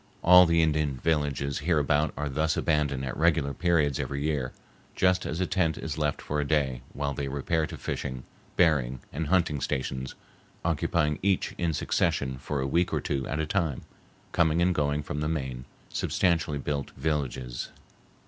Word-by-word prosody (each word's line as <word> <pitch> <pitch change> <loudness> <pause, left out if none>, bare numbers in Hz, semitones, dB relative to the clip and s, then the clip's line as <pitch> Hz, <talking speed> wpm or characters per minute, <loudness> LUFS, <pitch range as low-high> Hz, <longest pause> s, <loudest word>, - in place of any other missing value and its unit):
All 90 +1 +8
the 85 0 +4
Indian 75 -3 +1
villages 70 -2 0
hereabout 75 -1 +2
are 75 - -2
thus 80 +4 0
abandoned 75 -4 +1
at 65 - -4
regular 80 -3 +2
periods 80 -6 +2
every 70 0 -2
year, 75 -5 -1 0.4
just 90 0 +2
as 80 - -3
a 95 - +2
tent 85 -4 +1
is 80 - -4
left 75 -2 -1
for 75 - -2
a - - +1
day, 70 -5 +1
while 70 -1 -2
they 70 +1 -3
repair 80 +4 0
to - - -8
fishing, 65 -2 -4 0.3
berrying, 70 -8 +3
and 75 +2 -2
hunting 85 -5 +2
stations, 65 0 -3 0.5
occupying 75 -2 +1
each 95 -1 +1
in 85 -1 +1
succession 65 -3 0
for 70 +1 -3
a 65 - -1
week 85 +6 +1
or - - +1
two 70 -2 -2
at 75 - -2
a 80 - 0
time, 80 -5 -1 0.5
coming 80 -1 +3
and 90 +1 +3
going 75 -2 0
from 75 - -4
the 75 +1 -1
main, 65 -5 -3 0.3
substantially 80 -5 +1
built 70 0 -3
villages. 65 -5 -2
75 Hz, 170 wpm, -28 LUFS, 70-80 Hz, 0.5 s, All